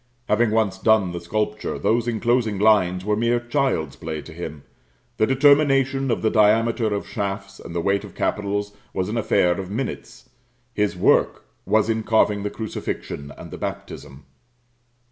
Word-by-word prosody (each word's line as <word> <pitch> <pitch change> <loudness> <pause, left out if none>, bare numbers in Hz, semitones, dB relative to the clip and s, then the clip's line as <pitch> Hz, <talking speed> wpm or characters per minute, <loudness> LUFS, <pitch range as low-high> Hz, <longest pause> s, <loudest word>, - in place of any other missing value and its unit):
Having 115 +2 +3
once 105 -4 0
done 110 -4 +3
the 85 0 -5
sculpture, 105 +4 -2
those 120 +1 +1
enclosing 115 -2 +1
lines 95 -3 +3
were 105 0 +1
mere 120 +2 +1
child's 120 - -1
play 80 -1 -5
to 85 - -11
him; 80 -3 -7 0.5
the 110 - +3
determination 135 -1 +3
of 115 - -1
the 110 - +2
diameter 110 +2 +3
of 100 -1 -3
shafts 100 -1 -4
and 85 - -9
height 100 +4 0
of - - -11
capitals 105 0 -2 0.2
was 95 +1 -1
an 115 - -2
affair 90 -4 +2
of 95 -1 -6
minutes; 115 +1 -5 0.5
his 105 -3 0
work - - +2 0.2
was 110 0 +3
in 110 0 0
carving 105 -2 +2
the 105 - -2
Crucifixion 85 -9 -5
and - - -10
the - - -8
Baptism. 70 +1 -7
105 Hz, 160 wpm, -22 LUFS, 95-115 Hz, 0.5 s, Having